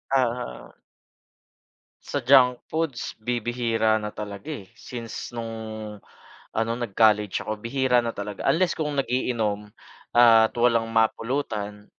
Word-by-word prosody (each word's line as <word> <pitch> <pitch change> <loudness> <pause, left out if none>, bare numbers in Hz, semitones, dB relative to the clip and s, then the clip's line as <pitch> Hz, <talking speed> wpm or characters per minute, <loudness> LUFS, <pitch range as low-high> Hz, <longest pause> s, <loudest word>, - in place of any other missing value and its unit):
Oo. 115 - -2 1.3
Sa 145 - -2
junk 125 -1 +5
foods 155 -7 -3
bibihira 115 -1 0
na 105 -1 -5
talaga, 105 0 -7
eh. 100 -8 -9
Since 120 -1 -7
nung 115 -1 -5 0.9
ano 115 +1 -1
nag-college 105 -3 +2
ako. 110 -1 -4
Bihira 125 +1 +2
na 115 - -2
talaga. 105 -2 -3
Unless 180 +2 +2
kung 150 -2 -3
nag-iinom, 115 -5 -1 0.5
at 115 -2 +7
walang 115 -1 +3
mapulutan 110 -2 -1
115 Hz, 110 wpm, -25 LUFS, 105-125 Hz, 1.3 s, at